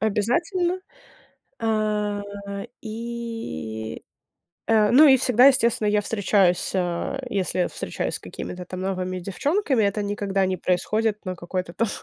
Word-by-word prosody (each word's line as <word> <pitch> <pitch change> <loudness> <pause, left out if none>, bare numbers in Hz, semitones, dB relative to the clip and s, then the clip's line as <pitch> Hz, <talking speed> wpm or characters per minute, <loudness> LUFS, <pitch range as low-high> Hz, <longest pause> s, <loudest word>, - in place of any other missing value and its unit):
обязательно. 340 - 0 0.8
А, 210 -2 0 0.6
и 225 - -5 0.6
э, 215 -2 +4
ну 300 +5 +8
и 265 - +8
всегда, 250 -1 +5
естественно, 235 -5 +4
я 210 0 +3
встречаюсь 200 -4 +2
а, 180 +7 -1
если 185 -3 0
встречаюсь - - -3
с - - -3
какими-то 180 0 -7
там 185 +1 -6
новыми 185 -1 -2
девчонками, 270 - 0
это 200 +1 0
никогда 200 -1 0
не 185 0 -1
происходит 210 +5 0
на 185 -1 -3
какой-то 175 0 -4
там, 230 +5 0
210 Hz, 125 wpm, -24 LUFS, 185-230 Hz, 0.8 s, ну